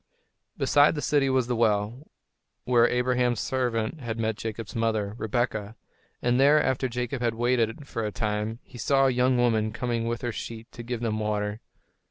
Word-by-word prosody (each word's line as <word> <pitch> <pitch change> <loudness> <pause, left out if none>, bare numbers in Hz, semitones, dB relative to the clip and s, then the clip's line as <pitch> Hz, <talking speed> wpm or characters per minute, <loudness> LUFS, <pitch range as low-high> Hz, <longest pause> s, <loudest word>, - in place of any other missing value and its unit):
Beside 145 +2 +4
the - - -2
city 145 -2 +2
was 130 -2 +2
the 120 0 -1
well, 115 +4 0 0.6
where 120 -1 +4
Abraham's 125 -1 +1
servant 125 0 -1
had 115 -4 -4
met 110 -1 -1
Jacob's 110 0 -6
mother, 110 -3 0
Rebekah; 110 -2 -2 0.5
and 120 +1 +2
there, 145 +3 +6
after 130 -2 0
Jacob 125 +1 -3
had 115 -2 0
waited 120 +2 0
for 115 -3 -3
a 105 - -2
time, 105 +1 -2
he 125 - -13
saw 135 +4 +3
a 135 - +4
young 125 +1 +2
woman 110 -3 +2
coming 115 0 -2
with 120 +1 -3
her 120 - -1
sheep 115 0 -7
to - - -9
give 120 0 -4
them 110 -2 -1
water. 105 0 -2
120 Hz, 180 wpm, -26 LUFS, 110-125 Hz, 0.6 s, there